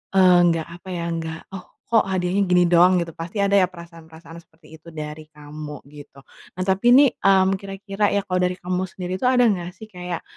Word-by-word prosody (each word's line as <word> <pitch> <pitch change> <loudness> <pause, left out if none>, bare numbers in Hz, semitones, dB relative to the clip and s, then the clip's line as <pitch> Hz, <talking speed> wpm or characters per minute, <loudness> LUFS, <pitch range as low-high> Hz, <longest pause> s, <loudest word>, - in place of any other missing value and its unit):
eee, 185 -2 +6
nggak 165 -2 0
apa 175 +2 -13
ya, 170 - -4 0.2
nggak, 160 0 -6
"Oh, 190 -1 -9 0.2
kok 225 -3 +3
hadiahnya 185 +1 -1
gini 180 0 +4
doang?" 175 +1 +5
Gitu. 165 - -10
Pasti 165 +5 -8
ada 200 0 +2
ya 185 - +3
perasaan-perasaan 165 -1 -13
seperti 160 -1 -23
itu 160 - -21
dari 155 0 -7
kamu 150 -1 -10
gitu. 145 -2 -14 0.3
Nah 185 - -3
tapi 190 +4 0
nih, 280 0 +7
mmm, 190 -1 +3
kira-kira 195 +1 -3
ya 200 - 0
kalau 185 -2 -2
dari 180 0 0
kamu 180 0 -3
sendiri 185 0 -6
tuh 250 - 0
ada 255 -1 +4
enggak 180 -6 0
sih 220 +3 -12
kayak, 180 -2 -6
180 Hz, 205 wpm, -22 LUFS, 165-190 Hz, 0.3 s, nih